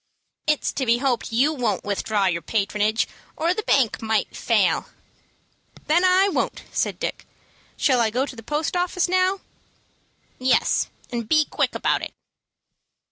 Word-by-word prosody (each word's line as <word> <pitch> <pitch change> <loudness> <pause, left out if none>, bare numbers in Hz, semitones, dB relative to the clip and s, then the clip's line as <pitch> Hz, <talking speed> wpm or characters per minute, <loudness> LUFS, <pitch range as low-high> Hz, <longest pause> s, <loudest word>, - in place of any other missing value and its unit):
"It's 300 -1 +1
to 270 - -2
be 230 +1 +4
hoped 245 -3 -1
you 265 +7 +3
won't 240 -9 -1
withdraw 205 0 0
your 170 -2 0
patronage, 210 +3 0 0.3
or 335 +2 +1
the 435 - -3
bank 270 - +2
might 220 -1 -1
fail." - - +1 1.0
"Then 335 +4 +3
I 370 +1 +5
won't," 400 - -2
said - - -1
Dick. - - -4 0.5
"Shall 260 -4 +3
I 230 -2 +3
go 250 +5 0
to 275 - -9
the 225 - -9
post 300 +8 -2
office 360 0 +1
now?" 370 +1 +1 1.0
"Yes, 255 0 +2 0.2
and 235 -3 -4
be 310 -1 +4
quick - - -1
about - - +1
it." - - -7
260 Hz, 150 wpm, -23 LUFS, 220-325 Hz, 1.0 s, I